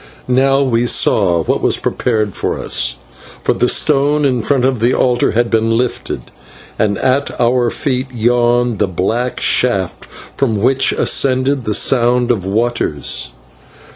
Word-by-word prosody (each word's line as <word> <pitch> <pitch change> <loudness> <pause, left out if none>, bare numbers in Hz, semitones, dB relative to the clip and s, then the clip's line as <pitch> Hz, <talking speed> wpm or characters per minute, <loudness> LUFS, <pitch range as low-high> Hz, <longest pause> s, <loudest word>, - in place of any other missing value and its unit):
Now 135 +2 +2
we 120 -2 0
saw 90 -8 +2
what - - -1
was - - +1
prepared 105 -3 -1
for - - -3
us, - - -2 0.5
for - - +1
the 125 - 0
stone 145 0 +2
in 125 -3 +1
front 130 +2 0
of 130 -3 0
the 120 +3 +1
altar 125 -1 +1
had 120 +1 0
been 115 0 +1
lifted, 125 0 -4 0.5
and 100 -2 +1
at 135 +2 -1
our 120 0 +2
feet 130 +1 -2
yawned 120 -1 +1
the - - +1
black 110 +8 -2
shaft 100 -8 0 0.3
from 115 -7 0
which 130 +5 +2
ascended 130 -1 +1
the 105 - -1
sound 125 -1 +2
of 100 -6 -2
waters. 110 -8 -2
120 Hz, 145 wpm, -15 LUFS, 110-130 Hz, 0.5 s, Now